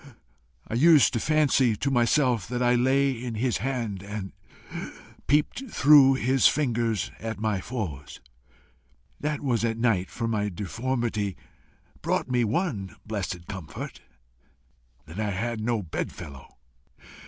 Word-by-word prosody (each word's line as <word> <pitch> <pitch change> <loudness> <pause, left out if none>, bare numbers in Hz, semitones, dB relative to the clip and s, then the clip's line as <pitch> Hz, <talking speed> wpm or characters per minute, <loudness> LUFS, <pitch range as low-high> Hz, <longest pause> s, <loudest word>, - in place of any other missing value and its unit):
I - - -6
used 150 +2 +6
to 115 - 0
fancy 140 -5 +3
to 140 +6 -1
myself 125 -2 +2
that 125 +1 -2
I 120 0 +4
lay 135 +3 +3
in 120 -2 -5
his 115 -2 0
hand 115 -4 -3
and 100 -1 -6 0.9
peeped 150 - +1
through 140 -5 +6
his 130 0 +3
fingers 120 -7 0
at 110 -1 -5
my 110 -3 0
foes. 90 - -6 1.0
That 150 -1 -2
was 120 -5 0
at 115 -1 0
night, 115 -6 +1
for 115 - -3
my 105 -2 0
deformity 110 +1 -2 0.6
brought - - -1
me 125 -1 +2
one 115 - -2
blessed 95 -5 -4
comfort 95 -5 -7 1.0
that 80 +5 -9
I 105 -1 0
had 110 +3 -2
no 115 -1 0
bedfellow. 70 -4 -7
115 Hz, 130 wpm, -26 LUFS, 105-130 Hz, 1.0 s, used